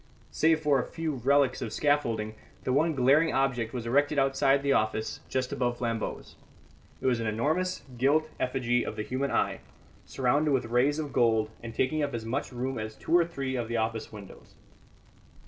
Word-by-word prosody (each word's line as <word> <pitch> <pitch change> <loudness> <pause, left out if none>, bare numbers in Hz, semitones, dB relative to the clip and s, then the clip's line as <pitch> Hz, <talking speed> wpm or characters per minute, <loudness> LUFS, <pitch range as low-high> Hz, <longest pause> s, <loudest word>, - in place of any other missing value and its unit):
Save 160 0 +2
for 145 -3 +3
a - - 0
few 160 -2 -3
relics 135 +1 +2
of 115 -4 -4
scaffolding, 115 -7 0 0.3
the 125 - 0
one 155 +3 +2
glaring 140 +5 +4
object 125 -4 0
was 120 -3 -5
erected 145 +5 +2
outside 135 0 +3
the 140 -1 +3
office 110 -2 -1
just 130 -1 -1
above 120 -3 -1
Flambeau's. 115 -2 -4 0.7
It - - -7
was 125 -3 +2
an 115 - -2
enormous 155 +12 -1 0.2
gilt 150 +5 +3
effigy 125 -2 0
of - - -5
the 105 - -3
human 130 +4 -2
eye, - - 0 0.5
surrounded 140 +4 +1
with 130 -3 +1
rays 125 +5 +2
of 150 -3 -4
gold, 110 -2 +2
and 115 -1 -8
taking 155 +4 +1
up 145 -3 -1
as 110 -1 -5
much 120 +4 -3
room 130 0 -3
as 110 0 -5
two 165 - 0
or 175 -1 +5
three 135 -5 -4
of 120 -3 -2
the 115 0 -2
office 110 0 -2
windows. 105 -3 -12
130 Hz, 185 wpm, -28 LUFS, 115-145 Hz, 0.7 s, or